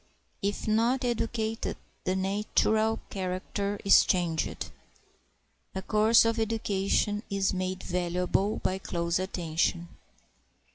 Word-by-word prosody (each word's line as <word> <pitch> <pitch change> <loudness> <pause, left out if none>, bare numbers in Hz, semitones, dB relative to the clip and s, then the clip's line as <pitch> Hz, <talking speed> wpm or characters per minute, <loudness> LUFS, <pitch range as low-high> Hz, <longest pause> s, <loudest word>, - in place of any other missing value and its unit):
If 200 +2 -2
not 235 +4 +2
educated, 225 -1 -2 0.3
the 185 - +1
natural 215 +3 +1
character 195 +2 -3
is 195 - +8
changed; 170 -4 -1 1.0
A 190 - -3
course 215 +3 +5
of 230 0 +1
education 210 -2 0
is 195 -1 +1
made 185 0 -3
valuable 180 +3 0
by 190 +1 -1
close 170 -2 -1
attention. 175 -1 -1
195 Hz, 100 wpm, -28 LUFS, 185-220 Hz, 1.0 s, is